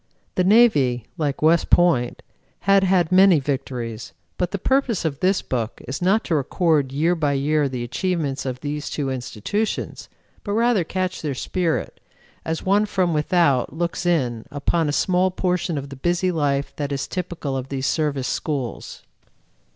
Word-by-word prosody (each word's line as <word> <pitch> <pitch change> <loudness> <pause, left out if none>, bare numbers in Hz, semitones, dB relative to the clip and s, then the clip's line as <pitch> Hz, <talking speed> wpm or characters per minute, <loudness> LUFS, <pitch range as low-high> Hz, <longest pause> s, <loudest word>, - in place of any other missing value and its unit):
The 185 - +1
Navy, 150 - +4
like 150 -4 -2
West 165 +2 +3
Point, 150 -9 +3 0.4
had 195 +1 +4
had 180 -3 +2
many 185 -3 +6
victories, 120 - -4 0.3
but 180 - +1
the 200 - -3
purpose 255 -3 0
of 145 -3 -2
this 190 +1 +1
book 115 -3 -3
is 135 +5 -4
not 195 +5 +3
to - - -2
record 150 -1 +1
year 160 +6 +2
by 150 -4 0
year 145 +1 +1
the 125 -2 -4
achievements 145 +2 -2
of 130 -1 -4
these 150 0 -4
two 140 -3 -2
institutions, 130 - -3 0.3
but 205 - -3
rather 230 -3 +3
catch 185 +2 -3
their 145 -4 -3
spirit, 170 +4 -2 0.4
as 160 0 -3
one 205 +3 +2
from 185 -4 0
without 150 -5 +2
looks 170 +2 -2
in 125 -10 0
upon 150 +2 0
a - - +1
small 185 +4 +2
portion 180 -3 -1
of 140 0 -5
the 135 - -8
busy 175 +6 0
life 145 -4 -1
that 145 -1 -3
is 140 -1 -2
typical 175 -6 -4
of 130 0 -4
these 135 -1 -3
Service 145 -5 0
schools. 135 -8 -4
155 Hz, 165 wpm, -22 LUFS, 135-180 Hz, 0.4 s, many